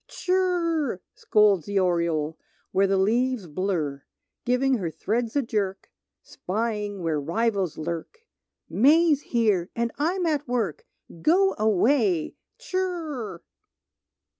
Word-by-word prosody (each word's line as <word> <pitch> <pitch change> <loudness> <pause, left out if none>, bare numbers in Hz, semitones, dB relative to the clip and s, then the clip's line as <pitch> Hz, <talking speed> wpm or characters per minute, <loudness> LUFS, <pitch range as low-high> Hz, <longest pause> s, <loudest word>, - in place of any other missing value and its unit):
"Tshirr!" 345 - 0
scolds 205 -6 +3
the 200 0 -1
oriole 170 -4 +1 0.4
Where 195 +1 +3
the 195 0 +2
leaves 235 +3 +1
blur, 155 -4 -2 0.4
Giving 250 0 +2
her 175 -4 -2
threads 225 - -2
a 285 - +2
jerk, 200 -4 -3 0.3
Spying 210 -1 -3
where 155 -3 0
rivals 195 +2 -1
lurk, 170 - -6 0.4
"May's 300 +4 +4
here, 210 -9 +1
and 235 0 -1
I'm 350 +4 0
at 295 -3 0
work. 230 -10 -2 0.3
Go 385 - +4
away, 215 - +2 0.2
tshirr!" 335 - -4
220 Hz, 110 wpm, -25 LUFS, 185-285 Hz, 0.4 s, May's